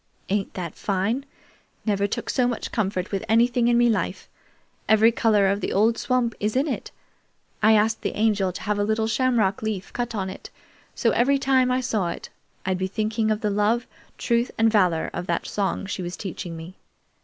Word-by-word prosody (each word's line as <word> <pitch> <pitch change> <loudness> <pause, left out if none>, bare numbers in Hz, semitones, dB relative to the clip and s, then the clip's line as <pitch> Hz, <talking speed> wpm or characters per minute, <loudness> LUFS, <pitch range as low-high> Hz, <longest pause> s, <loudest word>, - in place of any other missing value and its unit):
"Ain't 200 0 -1
that 175 -4 -4
fine? 210 +8 -1 0.6
Never 200 -2 +1
took - - -4
so 250 -2 +2
much 240 -2 -3
comfort 190 -4 -1
with 195 0 -2
anything 235 +1 +3
in 240 0 +4
me 240 0 +5
life. 225 -3 -1 0.6
Every 220 +1 +6
color 220 -3 +3
of 200 +2 0
the - - -2
old 220 +4 +3
swamp 240 -1 0
is 210 +2 -1
in 275 +4 +2
it. 275 - -3 0.7
I 220 +1 +6
asked 220 +1 +2
the - - -3
Angel 205 -3 +2
to 180 - -8
have 205 +1 -1
a - - +2
little 220 +1 +1
shamrock 225 -4 +1
leaf 215 -4 -4
cut 240 -2 -3
on 190 -2 -2
it, 190 - -8 0.5
so 230 - +2
every 270 +5 +3
time 260 -2 +2
I 255 +1 +1
saw 210 -7 -1
it - - -7 0.4
I'd 185 -1 0
be 190 - 0
thinking 215 +2 -1
of 215 +1 0
the 210 -2 0
'love, 210 +4 +1 0.3
truth, 235 0 +1
and 225 0 +4
valor' 180 -7 +2
of 175 +1 -4
that - - -1
song 200 -1 -2
she 195 -1 -4
was 175 0 -5
teaching 175 -3 -6
me. 165 +3 -9
215 Hz, 200 wpm, -24 LUFS, 195-235 Hz, 0.7 s, Every